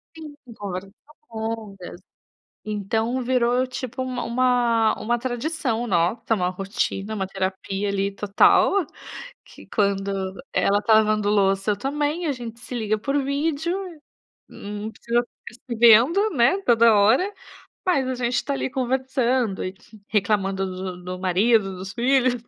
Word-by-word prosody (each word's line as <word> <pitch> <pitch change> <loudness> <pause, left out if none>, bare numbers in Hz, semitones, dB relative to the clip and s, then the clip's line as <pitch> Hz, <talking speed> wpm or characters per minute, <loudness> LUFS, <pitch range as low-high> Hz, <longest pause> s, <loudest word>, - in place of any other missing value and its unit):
Sim 310 -2 -10 0.2
conversas 195 -1 -6 0.4
longas, 220 -5 -6 0.7
então 220 +4 -1
virou 250 0 +2
tipo 255 0 -5
uma 255 -1 -3
uma 240 -2 +2
uma 240 +3 0
tradição 250 -1 -2
nota, 180 +6 +1
uma 180 -2 0
rotina, 195 +2 -3
uma 190 -2 -2
terapia 195 +1 -3
ali 200 0 -1
total, 210 - +3 0.6
que - - -15
quando 195 -2 -1 0.2
ela 205 +1 +2
tá 220 +1 +4
lavando 215 -1 +3
louça 195 0 +2
e - - +4
eu - - -13
também, 295 +6 -1
a 295 - +1
gente 235 -3 -8
se 250 - -9
liga 215 -2 -1
por 275 +6 -1
vídeo, 300 +5 -1 0.7
não 205 +1 -7
precisa 235 +2 -1 0.5
ficar 235 - -4
vendo 245 - +6
né, 285 - +3
toda 235 -5 +5
hora, 235 - +3 0.5
mas 280 -8 +2
a 260 - -1
gente 245 0 -1
tá 280 - -2
ali 270 - -2
conversando 255 -4 0
e 185 - -4 0.3
reclamando 195 -2 0
do 185 -1 -6
do 180 0 -6
marido, 195 +2 +2
dos 190 +1 -7
filhos. 255 +1 +2
225 Hz, 140 wpm, -23 LUFS, 195-255 Hz, 0.7 s, vendo